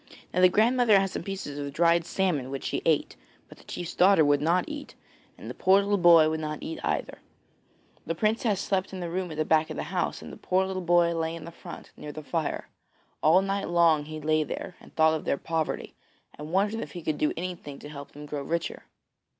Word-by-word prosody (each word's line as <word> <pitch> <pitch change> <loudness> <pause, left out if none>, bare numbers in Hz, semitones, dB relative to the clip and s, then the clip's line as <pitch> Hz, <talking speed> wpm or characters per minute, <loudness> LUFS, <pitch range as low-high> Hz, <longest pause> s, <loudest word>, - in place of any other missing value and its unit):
Now 180 - +2
the 185 - +8
grandmother 225 +1 +4
had 195 -1 -1
some - - -4
pieces 170 -6 -5
of 140 0 -4
dried 170 +1 +3
salmon 170 -10 -1
which 135 0 -5
she - - -2
ate; - - +1 0.3
but - - -15
the - - -17
chief's 175 -2 -6
daughter 185 -4 +5
would 145 0 +3
not 170 +4 +2
eat, 295 -1 -8 0.4
and - - -10
the - - -5
poor 190 +1 +4
little 200 0 +1
boy 170 -3 +7
would 160 0 -1
not 155 -1 -3
eat 160 - -5
either. - - -2 0.9
The 165 - -1
princess 215 +1 +1
slept 195 -1 -1
in 185 -1 -5
a 170 - -4
room 185 0 -2
at 155 - -7
the 155 - 0
back 155 0 +3
of - - -5
the - - -2
house 180 - -1
and - - -9
the - - -10
poor 185 +1 +1
little 190 -1 -3
boy 175 -1 +3
lay 165 0 -2
in 165 -2 -9
the 170 - -8
front, - - -11
near 150 - -8
the 155 +1 -8
fire. 155 +3 -2 0.5
All 170 +5 +5
night 195 0 -2
long 165 -3 +4
he 155 0 -7
lay 155 +1 +1
there 180 - -6
and - - -16
thought 160 0 +4
of 160 - -2
their - - 0
poverty, 160 0 -3 0.4
and 150 +1 -9
wondered 205 +4 +1
if - - -7
he 175 -3 -7
could 155 -1 -2
do 150 - +2
anything 170 -5 -6
to - - -10
help 140 -1 -9
them 150 +1 -9
to - - -14
grow 145 -1 -2
richer. 165 +4 -3
170 Hz, 235 wpm, -27 LUFS, 155-190 Hz, 0.9 s, the